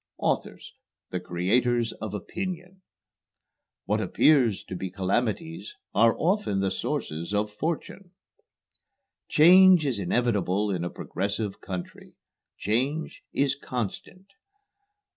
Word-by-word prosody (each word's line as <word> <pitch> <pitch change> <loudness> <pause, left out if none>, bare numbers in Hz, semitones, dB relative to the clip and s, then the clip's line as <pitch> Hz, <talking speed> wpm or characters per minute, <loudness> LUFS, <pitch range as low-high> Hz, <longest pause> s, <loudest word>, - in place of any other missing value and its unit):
"Authors - - -2 0.4
the 90 - -2
creators 115 +7 +1
of 105 -1 -6
opinion." 180 - -6 1.0
"What - - 0
appear 135 -7 +4
to 95 -1 -8
be 95 +1 -4
calamities 120 - -2 0.2
are 115 0 +4
often 180 - +1
the 95 -1 0
sources 85 +6 -3
of 105 0 0
fortune." 170 - -4 1.2
"Change 180 +1 +7
is 125 -7 -1
inevitable 105 -1 0
in 90 -3 -2
a 85 - -2
progressive 100 +3 -4
country. 90 -2 -8 0.4
Change 130 +10 -1
is 140 -1 +1
constant." 125 - -5
115 Hz, 105 wpm, -26 LUFS, 95-160 Hz, 1.2 s, Change